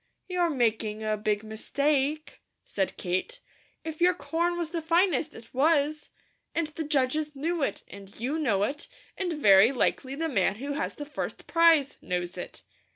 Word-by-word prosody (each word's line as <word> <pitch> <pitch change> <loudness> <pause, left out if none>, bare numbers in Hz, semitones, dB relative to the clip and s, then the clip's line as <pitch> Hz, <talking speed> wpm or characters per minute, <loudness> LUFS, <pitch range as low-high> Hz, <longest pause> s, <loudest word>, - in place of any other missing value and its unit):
"You're 360 -2 +1
making 220 -5 0
a 215 0 0
big 210 0 -1
mistake," 280 +7 -1 0.2
said 195 -2 -2
Kate. 185 - -2 0.4
"If 320 0 -6
your 360 +1 +5
corn 340 +3 -1
was 335 -2 -3
the 335 -1 -2
finest, 335 -2 +2
it 225 0 -13
was, 300 +2 +2 0.5
and 335 - +1
the 315 +1 -5
judges 295 +1 0
knew 325 +4 -1
it, 240 -8 -1
and 200 0 -12
you 275 +7 -1
know 205 -10 +1
it, 280 +7 -3 0.3
and 370 -2 -2
very 210 -6 +6
likely 265 +1 0
the 325 +3 -1
man 200 - +1
who 275 +6 -5
has 285 - -2
the 290 - -6
first 295 - -5
prize, 330 -4 +4
knows 180 0 -3
it. - - -8
285 Hz, 165 wpm, -28 LUFS, 220-325 Hz, 0.5 s, very